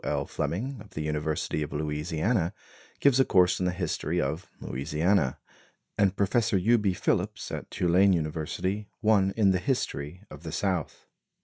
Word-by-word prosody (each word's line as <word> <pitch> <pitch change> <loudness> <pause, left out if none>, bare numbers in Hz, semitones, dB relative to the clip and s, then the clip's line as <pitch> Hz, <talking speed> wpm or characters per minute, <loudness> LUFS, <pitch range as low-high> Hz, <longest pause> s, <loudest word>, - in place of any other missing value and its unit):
L. 70 -1 -1
Fleming, 105 - -3
of 105 - -15
the 75 - -2
University 75 0 -1
of 75 - -3
Louisiana, 80 +6 -1 0.5
gives 135 -2 +4
a - - +7
course 90 -6 +3
in 90 - +1
the - - +1
history 85 -2 -2
of 80 +5 -2
Louisiana, 75 +2 0 0.6
and 100 -2 +2
Professor 105 +1 +2
U. 115 +6 +4
B. 100 -2 +1
Phillips, - - -1
at - - -5
Tulane 90 +3 +3
University, 85 +5 -2
one 100 -3 +4
in 100 -3 +5
the 90 - +2
history 90 - -2
of 75 - -10
the 80 -2 -6
South. 90 -2 -2
90 Hz, 155 wpm, -28 LUFS, 75-100 Hz, 0.6 s, a